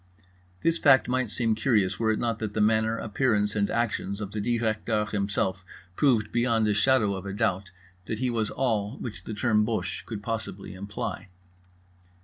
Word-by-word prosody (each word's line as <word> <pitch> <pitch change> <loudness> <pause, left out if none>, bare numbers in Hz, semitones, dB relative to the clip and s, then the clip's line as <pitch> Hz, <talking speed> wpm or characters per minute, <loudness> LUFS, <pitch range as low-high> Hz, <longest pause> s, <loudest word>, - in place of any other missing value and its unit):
This 165 0 +2
fact 135 -3 +5
might 130 -1 0
seem 115 +1 0
curious 105 -5 +1
were 110 -1 +1
it 110 - 0
not 115 -2 -1
that 105 -2 -4
the - - 0
manner, 110 +1 +2
appearance 105 -2 0
and 100 -1 +1
actions 110 -4 -1
of 100 -2 -5
the 105 - -3
Directeur 110 -1 0
himself 100 -3 -1 0.3
proved 115 -6 +2
beyond 115 -2 +2
a 105 - +3
shadow 110 -1 +3
of 95 0 -6
a 100 - -4
doubt 100 -3 0 0.4
that 110 - -2
he 125 +1 0
was 110 -2 0
all 115 -3 -1
which 90 -8 -7
the 110 - -5
term 105 -1 +2
Boche 90 -8 -2
could 105 -3 -6
possibly 110 -4 -4
imply. 100 0 -5
110 Hz, 175 wpm, -27 LUFS, 100-115 Hz, 0.4 s, fact